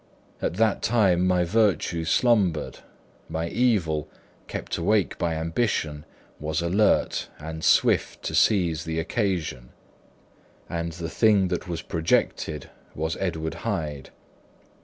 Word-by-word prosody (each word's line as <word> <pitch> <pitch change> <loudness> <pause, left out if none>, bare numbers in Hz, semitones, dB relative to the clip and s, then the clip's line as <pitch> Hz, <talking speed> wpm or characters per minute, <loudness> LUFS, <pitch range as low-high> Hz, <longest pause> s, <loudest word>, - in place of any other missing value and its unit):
At - - -1
that 110 +1 +2
time 95 -6 +3
my 90 -1 +3
virtue 90 -4 +1
slumbered; 95 -5 +2 0.5
my 80 +1 -2
evil, 85 -12 +1 0.4
kept - - -4
awake 100 +3 +2
by 85 -2 0
ambition, 80 -3 -1 0.3
was 75 +1 -2
alert 100 +5 +2
and 80 +1 -7
swift - - +3
to - - -3
seize 85 -6 +3
the 80 0 -2
occasion; 85 - -2 1.0
and 85 -1 -3
the 85 0 -5
thing 100 +1 +3
that 90 0 -3
was 85 -1 -4
projected 80 -2 -1 0.2
was 80 +1 -2
Edward 80 -4 -2
Hyde. 75 -4 -3
85 Hz, 115 wpm, -25 LUFS, 80-100 Hz, 1.0 s, time